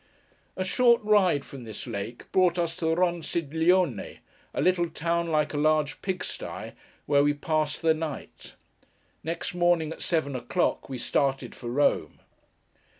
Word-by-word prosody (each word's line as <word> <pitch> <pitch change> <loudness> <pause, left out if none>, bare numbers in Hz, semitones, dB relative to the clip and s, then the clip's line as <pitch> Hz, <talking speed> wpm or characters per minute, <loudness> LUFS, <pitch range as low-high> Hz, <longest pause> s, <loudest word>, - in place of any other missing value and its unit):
A 185 - 0
short 235 +5 +4
ride 190 -9 +3
from 135 -3 -10
this 110 -2 -7
lake, 115 0 -5
brought 180 -2 +3
us 170 -1 -1
to 165 - -3
Ronciglione; 170 0 +1 0.3
a - - -4
little 175 -2 +2
town 170 +1 -1
like 155 -2 +1
a - - -2
large 155 0 +1
pig 190 -2 -2
sty, - - -6 0.3
where 140 0 +4
we 145 0 +2
passed 155 +1 -1
the 160 -1 +5
night. 155 -2 -7 0.7
Next 165 +2 -3
morning 175 -3 +2
at - - -13
seven 155 -5 0
o'clock, 170 +6 -1
we 130 - -4
started 135 +2 0
for 120 - -7
Rome. 145 +4 +1
160 Hz, 150 wpm, -27 LUFS, 145-175 Hz, 0.7 s, the